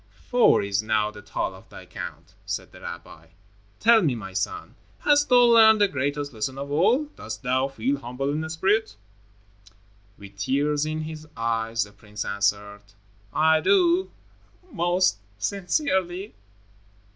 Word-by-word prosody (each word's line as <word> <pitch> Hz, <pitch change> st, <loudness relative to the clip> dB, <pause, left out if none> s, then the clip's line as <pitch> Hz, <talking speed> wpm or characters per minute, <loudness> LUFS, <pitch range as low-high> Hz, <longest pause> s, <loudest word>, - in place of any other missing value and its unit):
"Four 245 Hz, -, +5 dB
is 100 Hz, 0 st, 0 dB
now 110 Hz, -1 st, 0 dB
the 105 Hz, -, -12 dB
toll -, -, -3 dB
of -, -, -16 dB
thy -, -, -12 dB
count," -, -, -9 dB
said -, -, -4 dB
the -, -, -15 dB
rabbi. 80 Hz, +1 st, -9 dB, 0.5 s
"Tell 230 Hz, 0 st, +6 dB
me, 145 Hz, -9 st, +1 dB
my 95 Hz, -4 st, -8 dB
son, 95 Hz, 0 st, -3 dB, 0.3 s
hast 290 Hz, 0 st, +3 dB
thou 250 Hz, -1 st, +6 dB
learned 225 Hz, -2 st, +7 dB
the 205 Hz, -, +5 dB
greatest 145 Hz, -1 st, -3 dB
lesson 115 Hz, +4 st, -4 dB
of 140 Hz, +1 st, -6 dB
all? 200 Hz, -, +3 dB
Dost -, -, -8 dB
thou 130 Hz, +1 st, +1 dB
feel 135 Hz, +1 st, -2 dB
humble 130 Hz, +2 st, -3 dB
in 160 Hz, +2 st, -3 dB
spirit?" 190 Hz, -, 0 dB, 1.2 s
With 100 Hz, -1 st, -13 dB
tears 145 Hz, +6 st, 0 dB
in 155 Hz, 0 st, -3 dB
his 155 Hz, 0 st, -8 dB
eyes, 115 Hz, 0 st, -1 dB
the 105 Hz, -, -12 dB
prince 105 Hz, 0 st, -8 dB
answered, 100 Hz, 0 st, -1 dB, 0.5 s
"I 160 Hz, +3 st, +3 dB
do, 365 Hz, -, +3 dB, 0.6 s
most 175 Hz, -, +1 dB, 0.2 s
sincerely." 190 Hz, -, -1 dB
145 Hz, 145 wpm, -25 LUFS, -, 1.2 s, learned